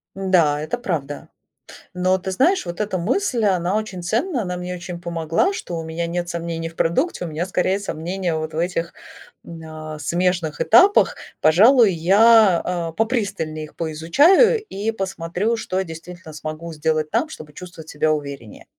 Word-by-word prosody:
Да, 175 -6 +2
это 155 +11 -3
правда. 160 - -4 0.7
Но 185 +1 +1
ты 190 +1 -5
знаешь, 335 - +2
вот 175 +3 -5
эта 205 -3 -2
мысль, 235 - 0
она 185 -1 +1
очень 200 -5 -5
ценна, 240 - -1
она 180 -3 -4
мне 180 0 -5
очень 175 -1 -7
помогла, 170 - 0
что 175 - -5
у 165 - -4
меня 160 +1 -3
нет 175 +1 -3
сомнений 170 -1 -4
в 165 - -12
продукте, 180 - 0
у - - -3
меня 160 +3 -3
скорее 190 +1 0
сомнения 180 -1 -3
вот 155 0 -4
в 155 - -5
этих, 170 0 -2 0.5
м, 165 -1 -10
а, 155 -1 -8
смежных 175 0 -1
этапах. 385 - +5 0.2
Пожалуй 210 - +5
я, 195 +2 +5 0.3
э, - - -20
попристальнее 200 -10 -2
их 150 - -18
поизучаю, 285 - +4
и 210 - -3
посмотрю 190 +1 -2
что 190 -4 -2
действительно 165 0 -10
смогу 155 +2 -7
сделать 155 0 -1
там, 240 +8 0
чтобы 155 - -11
чувствовать 170 -2 -11
себя 155 +1 0
увереннее. 140 -7 -5
175 Hz, 165 wpm, -21 LUFS, 160-200 Hz, 0.7 s, этапах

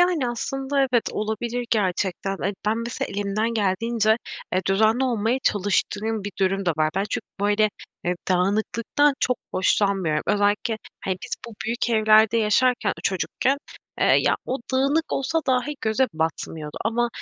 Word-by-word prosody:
Yani, 345 -8 +3
aslında 270 +3 -2
evet, 255 -4 +3
olabilir 230 +3 -2
gerçekten. 195 -2 0
E, 200 - 0
ben 220 +2 +2
mesela 230 0 -3
elimden 205 +3 -1
geldiğince, 220 +2 +2 0.4
eee, 185 +1 +1
düzenli 220 +6 +3
olmaya 235 0 +1
çalıştığım 205 +1 0
bir 205 - -4
durum 195 0 +1
da - - +4
var. 155 0 +2
Ben 195 - +1
çünkü, - - -2 0.2
böyle, 210 +1 +3 0.3
eee, 180 - +1
dağınıklıktan 220 +9 +2
çok 250 -2 +2 0.2
hoşlanmıyorum. 185 -4 +1
Özellikle, 205 +2 +1 0.3
hani, 185 -1 -1
biz - - -10 0.2
bu 225 - -11
büyük 235 +2 -1
evlerde 220 0 +5
yaşarken, 240 +3 +2
ııı, - - 0
çocukken, 225 +8 0 0.4
eee, - - +4
ya, - - +4
o 260 - -1
dağınık 280 +5 +1
olsa 275 +5 0
dahi 260 +3 +1
göze 225 +4 +2
batmıyordu 160 -1 -3
ama 235 +2 +1
220 Hz, 150 wpm, -24 LUFS, 195-245 Hz, 0.4 s, evlerde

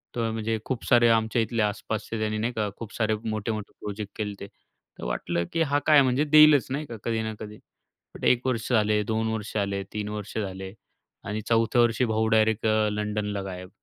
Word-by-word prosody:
तर 115 -1 0
म्हणजे 110 0 -1
खूप 130 -3 -3
सारे 120 -1 +5
आमच्या 115 +1 +2
इथले 115 0 -1
आसपासचे 110 +1 -3
त्यांनी 110 0 -1
नाही 120 +3 -1
का, 105 -2 -1
खूप 115 -2 -8
सारे 110 -1 +1
मोठे-मोठे 110 0 -3
प्रोजेक्ट 105 0 -6
केलेते. 105 -2 -5 0.5
तर - - -8
वाटलं 85 +8 -1
की 165 - +1
हा 145 -2 +2
काय 150 -2 +7
म्हणजे 130 +2 +2
देईलच 150 -2 +7
नाही 150 +3 -2
का 120 -5 -8
कधी 115 -1 -1
ना 110 0 -3
कधी, 105 0 -8 0.6
पण - - -12
1 125 0 +3
वर्ष 120 -1 -1
झाले, 105 -2 +3
2 110 +1 -1
वर्ष 110 -1 -5
झाले, 100 -1 -1
3 105 -1 -3
वर्ष 105 0 -6
झाले 95 -2 -4 0.5
आणि 105 +2 -3
चौथ्या 115 +1 +3
वर्षी 120 +1 +2
भाऊ 110 0 +1
डायरेक्ट 110 0 +2
अ, 110 0 +2
लंडनला 105 -1 -2
गायब. 90 -1 -7
110 Hz, 195 wpm, -26 LUFS, 105-115 Hz, 0.6 s, काय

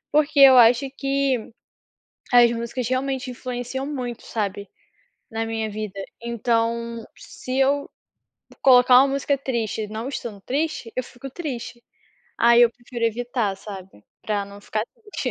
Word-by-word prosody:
Porque 295 -1 +3
eu 265 -2 +9
acho 240 +2 +6
que, 275 -4 -1 0.8
as 240 -1 +7
músicas 235 +1 -3
realmente 260 0 -2
influenciam 250 +1 -5
muito, 250 -5 -5
sabe, 200 -2 -3 0.6
na 225 0 -2
minha 225 -1 -3
vida. 205 -2 -6 0.2
Então, 235 0 -1
se 255 +1 -6
eu 280 +1 +2 0.7
colocar 250 -1 +7
uma 275 - +4
música 280 0 0
triste 230 -5 -3
não 220 +4 -5
estando 230 -7 -6
triste, 285 -4 -2
eu 255 - -1
fico 250 +2 -10
triste, 250 -6 -6 0.6
aí 235 0 +6
eu 235 - +5
prefiro 240 -1 -6
evitar, 230 -3 -1
sabe, 190 - -11 0.2
para 205 -2 -2
não 200 0 -12
ficar 215 +1 -2 0.4
triste - - -1
240 Hz, 135 wpm, -23 LUFS, 225-265 Hz, 0.8 s, eu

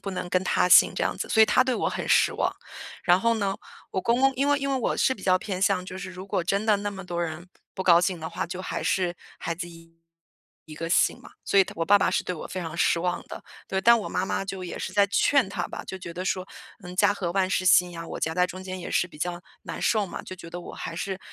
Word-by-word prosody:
不 200 - -4
能 180 - -4
跟 185 0 +2
他 185 - +2
姓 - - +8
这 - - 0
样 - - -1
子。 - - -4
所 220 - +5
以 - - +9
他 235 - +4
对 260 -1 0
我 - - -1
很 - - -3
失 - - +4
望， - - 0 0.5
然 180 +1 +5
后 230 +2 +2
呢， 200 -3 -1 0.4
我 190 - -1
公 235 +5 +1
公 270 0 +5
因 275 +2 +1
为 290 0 +3
因 275 0 -2
为 270 - +1
我 - - -1
是 260 - +2
比 195 - -14
较 185 -1 +4
偏 185 -1 -4
向 190 -1 +2
就 185 0 -7
是 190 0 -6
如 185 +1 -9
果 185 - -1
真 195 +4 0
的 210 -2 +3
那 205 0 -3
么 195 -2 -8
多 175 -1 -3
人 170 +1 -5 0.3
不 190 - -3
高 175 -2 +6
兴 180 0 0
的 160 0 -6
话， - - -3
就 180 +2 -6
还 - - -4
是 180 -3 0 0.2
孩 165 - -3
子 175 +1 -6
一 165 0 -16 0.7
一 155 - -10
个 165 +2 -5
姓 170 - +3
嘛。 - - -14
所 200 - +2
以 195 - +7
他 - - -9
我 165 - 0
爸 205 +4 +6
爸 - - +2
是 - - 0
对 - - -3
我 160 - -7
非 185 - -5
常 165 -3 -6
失 170 - +2
望 180 0 -1
的， - - -9 0.2
对。 190 - -1
但 235 +4 +6
我 215 - -5
妈 185 - -1
妈 195 - -2
就 195 -1 -5
也 180 - -6
是 - - -4
在 200 -1 +4
劝 240 +4 +3
他 195 - -3
吧， - - -7
就 190 - -6
觉 170 -2 -8
得 180 +2 -4
说， 185 0 -1 0.4
嗯， 180 0 -8
“家 205 +2 +4
和 180 -4 -3
万 190 0 +1
事 185 - 0
兴” 180 0 +6
呀， 165 -1 -7
我 - - -6
夹 160 - 0
在 180 +1 +3
中 185 +1 -8
间 185 0 -6
也 175 - -7
是 180 - +1
比 150 - -15
较 175 +2 -3 0.2
难 - - -6
受 215 -3 +2
嘛， - - -7
就 185 - -9
觉 170 -2 -10
得 175 +1 -6
我 - - -9
还 165 - -6
是， 190 +2 -4
185 Hz, 315 characters per minute, -26 LUFS, 175-200 Hz, 0.7 s, 以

